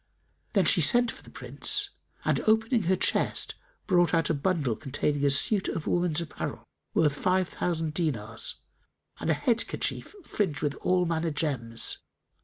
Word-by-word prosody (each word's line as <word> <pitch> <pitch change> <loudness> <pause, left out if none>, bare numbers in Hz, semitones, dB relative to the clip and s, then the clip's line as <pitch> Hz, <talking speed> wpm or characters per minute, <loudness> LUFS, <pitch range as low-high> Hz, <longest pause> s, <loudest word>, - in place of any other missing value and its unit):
Then 195 -4 +3
she 180 - +5
sent 240 +10 +4
for - - -12
the - - -15
Prince 410 -1 -1 0.3
and, - - +2
opening 220 +2 +3
her 190 +2 +3
chest, - - +1 0.3
brought 175 -3 +3
out 165 -1 +1
a - - +2
bundle 145 -5 0
containing 145 +3 -2
a 140 - +4
suit 190 +8 +3
of 160 - -3
woman's 175 -3 +1
apparel, 170 -3 -5 0.3
worth 150 -3 +3
five 185 +4 +1
thousand 165 -3 -2
dinars, 115 -10 -2 0.6
and - - -3
a 160 - +4
head 225 - +1
kerchief - - -3
fringed 190 - -2
with 145 -1 0
all 180 -1 +1
manner 165 0 -1
gems. 130 -7 -1
165 Hz, 160 wpm, -28 LUFS, 145-185 Hz, 0.6 s, she